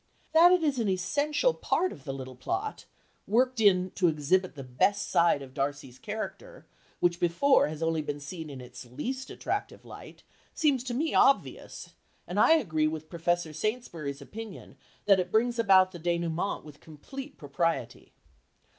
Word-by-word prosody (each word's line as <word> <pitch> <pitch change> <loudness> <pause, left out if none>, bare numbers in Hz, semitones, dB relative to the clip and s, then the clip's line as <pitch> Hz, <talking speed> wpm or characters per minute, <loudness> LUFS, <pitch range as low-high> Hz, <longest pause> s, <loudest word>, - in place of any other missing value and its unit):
That 335 +2 +7
it 365 -2 +3
is 285 -5 +1
an 220 -3 0
essential 290 - +1
part 370 -5 0
of - - -12
the 135 - -3
little 130 -1 -7
plot, 385 - -4 0.4
worked 255 +3 +2
in 185 -3 +4
to 180 - +1
exhibit 165 +4 +1
the 135 - -7
best 130 +11 0
side 170 -4 +3
of 130 -1 -12
Darcy's 135 -2 -4
character, 225 - -7 0.3
which 175 -1 +1
before 175 +12 +3
has 155 +1 -5
only 165 -1 0
been 145 -1 -4
seen 160 +2 -7
in 135 -3 -8
its 125 -1 -10
least 245 - -5
attractive - - -4
light, - - -12 0.3
seems 285 -6 +2
to 245 -2 -3
me 315 +5 -1
obvious, 275 - +1 0.3
and - - -3
I - - +6
agree 160 - +1
with 155 0 -6
Professor 170 -1 -1
Saintsbury's 160 - -4
opinion 220 +5 -9 0.3
that 195 -2 +5
it 180 -1 -1
brings 235 +2 +1
about 190 -4 +5
the 175 - -9
dénouement 170 +2 -1
with 150 -2 -13
complete 270 - -10
propriety. 165 +3 -2
175 Hz, 165 wpm, -28 LUFS, 150-245 Hz, 0.4 s, That